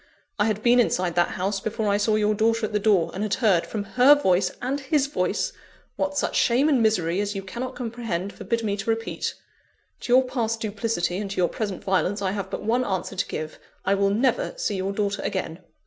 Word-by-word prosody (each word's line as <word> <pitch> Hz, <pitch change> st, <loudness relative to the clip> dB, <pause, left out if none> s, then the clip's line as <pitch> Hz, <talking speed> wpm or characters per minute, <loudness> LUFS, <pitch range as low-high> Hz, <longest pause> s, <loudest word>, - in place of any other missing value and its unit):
I 205 Hz, -, +4 dB
had 215 Hz, -1 st, -1 dB
been 245 Hz, +1 st, +5 dB
inside 180 Hz, -7 st, +1 dB
that 175 Hz, 0 st, +3 dB
house, 195 Hz, +2 st, -1 dB
before 220 Hz, +2 st, -2 dB
I 200 Hz, -, +3 dB
saw 215 Hz, +1 st, +2 dB
your 215 Hz, 0 st, +2 dB
daughter 225 Hz, +1 st, +1 dB
at 215 Hz, -, -6 dB
the 210 Hz, -, +2 dB
door; 200 Hz, -5 st, +2 dB
and 190 Hz, -, -4 dB
had 210 Hz, -1 st, 0 dB
heard, 200 Hz, -9 st, +2 dB
from 210 Hz, -2 st, -3 dB
her 255 Hz, +7 st, +6 dB
voice 185 Hz, -9 st, +2 dB
and 265 Hz, +3 st, -2 dB
his 275 Hz, +1 st, +1 dB
voice, 285 Hz, -, -1 dB, 0.4 s
what 290 Hz, 0 st, -2 dB
such -, -, 0 dB
shame 255 Hz, +4 st, +3 dB
and 270 Hz, -5 st, +3 dB
misery 190 Hz, -5 st, +2 dB
as 205 Hz, 0 st, -3 dB
you 195 Hz, -, -4 dB
cannot 245 Hz, +7 st, -5 dB
comprehend 225 Hz, -6 st, -4 dB
forbid 230 Hz, -1 st, -2 dB
me 205 Hz, -2 st, 0 dB
to 195 Hz, +3 st, -4 dB
repeat. 225 Hz, 0 st, -2 dB, 0.6 s
To 245 Hz, -, -1 dB
your 260 Hz, +1 st, +7 dB
past 230 Hz, -3 st, -2 dB
duplicity, 205 Hz, -4 st, -1 dB
and 205 Hz, -1 st, -4 dB
to 200 Hz, -, -6 dB
your 175 Hz, -1 st, +2 dB
present 205 Hz, -5 st, -4 dB
violence, 190 Hz, +1 st, +1 dB
I 195 Hz, -2 st, -1 dB
have 195 Hz, -1 st, -4 dB
but -, -, -5 dB
one 235 Hz, +4 st, +1 dB
answer 190 Hz, -3 st, -3 dB
to 185 Hz, -, -1 dB
give: 155 Hz, 0 st, -5 dB, 0.3 s
I 195 Hz, -, +3 dB
will 200 Hz, 0 st, +2 dB
never 240 Hz, +4 st, +1 dB
see 205 Hz, -, -1 dB
your 190 Hz, +1 st, -2 dB
daughter 200 Hz, 0 st, -1 dB
again." 185 Hz, -4 st, -3 dB
210 Hz, 225 wpm, -24 LUFS, 195-230 Hz, 0.6 s, your